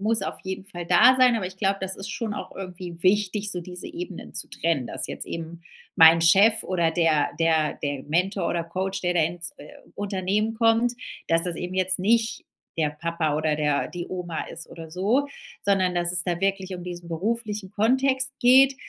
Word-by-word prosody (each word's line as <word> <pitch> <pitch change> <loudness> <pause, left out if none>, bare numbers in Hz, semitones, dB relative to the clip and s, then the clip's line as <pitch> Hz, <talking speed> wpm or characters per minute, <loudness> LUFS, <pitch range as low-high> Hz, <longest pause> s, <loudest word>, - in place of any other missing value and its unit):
muss 220 +2 +1
auf - - -4
jeden 190 0 -5
Fall 175 -4 -8
da 245 +9 +6
sein, 250 -2 +5
aber 190 -4 -2
ich 185 0 -10
glaube, 195 -1 +1
das 190 0 -3
ist 195 +2 -7
schon 220 0 -4
auch - - -7
irgendwie 180 -2 -7
wichtig, 205 +1 +1
so 180 -3 -3
diese 180 +1 -9
Ebenen 345 +1 -8
zu - - 0
trennen. 160 -7 -1
Dass 130 - -2
jetzt - - -6
eben 165 +1 -7 0.4
mein 165 0 +8
Chef 200 +6 +6
oder 170 -3 0
der 160 -3 +2
der 160 -2 +2
der 145 -2 -2
Mentor 185 +6 0
oder 170 -1 -1
Coach, 190 +3 -3
der 180 -1 +1
da 170 - +3
ins, 170 +1 -1
äh, 150 - -12 0.3
Unternehmen 205 +2 -1
kommt, 230 +1 +2 0.3
dass 165 0 +3
das 175 -2 -1
eben 180 +1 -5
jetzt 185 0 +1
nicht 225 +3 +1 0.3
der 155 -2 +2
Papa 155 0 -2
oder 155 0 +1
der 150 -1 0
die 175 -1 -6
Oma 175 -3 -4
ist 165 - -7
oder 165 -1 -10
so, 210 - +1 0.4
sondern 190 -3 +2
dass 175 0 +1
es 175 -1 +1
da 175 -2 -2
wirklich 195 -1 -1
um 180 - -7
diesen 175 -1 -7
beruflichen 210 +2 -3
Kontext 260 +5 +1
geht. 265 +2 +6
185 Hz, 195 wpm, -25 LUFS, 170-210 Hz, 0.4 s, mein